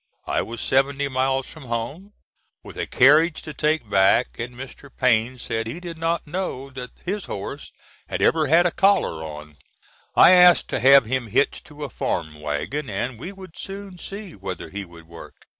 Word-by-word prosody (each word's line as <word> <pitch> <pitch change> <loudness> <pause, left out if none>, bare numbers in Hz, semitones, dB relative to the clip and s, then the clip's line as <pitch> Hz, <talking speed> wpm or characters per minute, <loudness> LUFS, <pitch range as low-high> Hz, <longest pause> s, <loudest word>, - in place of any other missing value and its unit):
I - - 0
was 115 0 -6
seventy 140 +1 +1
miles 135 0 0
from 155 -4 -11
home, 130 - -5 0.5
with - - -11
a - - -3
carriage 155 +5 +4
to 150 - -7
take 150 -4 0
back, 95 -10 +3
and 120 +1 -5
Mr. 135 +2 -10
Payne 125 -1 +1
said 115 -2 -3
he 140 +10 -5
did 170 -2 -8
not 165 +1 -1
know 150 -5 -4
that 125 -1 -7 0.2
his 200 +2 -3
horse 100 - -6 0.4
had - - -3
ever 160 -2 +3
had 165 +5 +5
a 175 - +2
collar 190 - +2
on. 75 -1 -9 0.6
I - - +8
asked 180 -1 +6
to - - -1
have 135 +1 +7
him 125 +1 -2
hitched 120 +10 0
to 150 -2 -10
a 145 - -4
farm 75 -6 -3
wagon 95 - -3
and 110 +4 -3
we 175 +9 -6
would 190 -4 -13
soon 195 -2 -8
see 200 +1 -8
whether 95 -2 -7
he 100 0 -5
would 85 -2 -15
work. 85 0 -12
135 Hz, 185 wpm, -23 LUFS, 110-165 Hz, 0.6 s, I